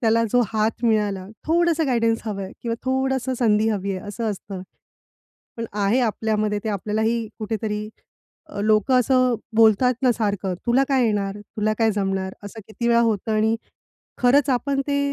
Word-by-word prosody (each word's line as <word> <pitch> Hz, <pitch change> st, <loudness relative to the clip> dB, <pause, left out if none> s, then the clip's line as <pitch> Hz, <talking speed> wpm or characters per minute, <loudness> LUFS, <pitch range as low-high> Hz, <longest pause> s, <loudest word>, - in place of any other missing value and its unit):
त्याला 230 Hz, -1 st, +3 dB
जो 245 Hz, -, +5 dB
हात 220 Hz, +2 st, 0 dB
मिळाला 205 Hz, -4 st, +1 dB, 0.2 s
थोडसं 330 Hz, -1 st, +2 dB
गाईडन्स 230 Hz, -3 st, +1 dB
हवंय 195 Hz, -3 st, -4 dB
किंवा 230 Hz, -1 st, -1 dB
थोडसं 265 Hz, 0 st, 0 dB
संधी 220 Hz, -2 st, +3 dB
हवी 200 Hz, -2 st, -1 dB
आहे 195 Hz, -, -8 dB
असं 220 Hz, +1 st, -2 dB
असतं. 195 Hz, -1 st, -7 dB, 0.9 s
पण 230 Hz, -, -4 dB
आहे 210 Hz, +4 st, +1 dB
आपल्यामध्ये 215 Hz, -2 st, 0 dB
ते -, -, -2 dB
आपल्यालाही 220 Hz, +3 st, -1 dB
कुठेतरी, 215 Hz, -1 st, -3 dB, 0.6 s
अ, 200 Hz, -, -7 dB
लोकं 215 Hz, +4 st, +3 dB
असं 255 Hz, -1 st, +3 dB, 0.2 s
बोलतात 225 Hz, +3 st, +5 dB
ना 250 Hz, -2 st, +4 dB
सारखं, 200 Hz, -4 st, -1 dB
तुला 260 Hz, +3 st, +3 dB
काय 265 Hz, -2 st, +3 dB
येणार? 200 Hz, -2 st, -1 dB
तुला 215 Hz, +1 st, -2 dB
काय 225 Hz, -1 st, +3 dB
जमणार? 195 Hz, -1 st, -2 dB
असं 220 Hz, +2 st, -8 dB
किती 235 Hz, +2 st, -3 dB
वेळा 235 Hz, 0 st, +4 dB
होतं 220 Hz, -2 st, 0 dB
आणि 220 Hz, +1 st, +2 dB, 0.7 s
खरंच 275 Hz, +3 st, +4 dB
आपण 275 Hz, +2 st, 0 dB
ते 280 Hz, 0 st, +1 dB
220 Hz, 160 wpm, -23 LUFS, 210-245 Hz, 0.9 s, जो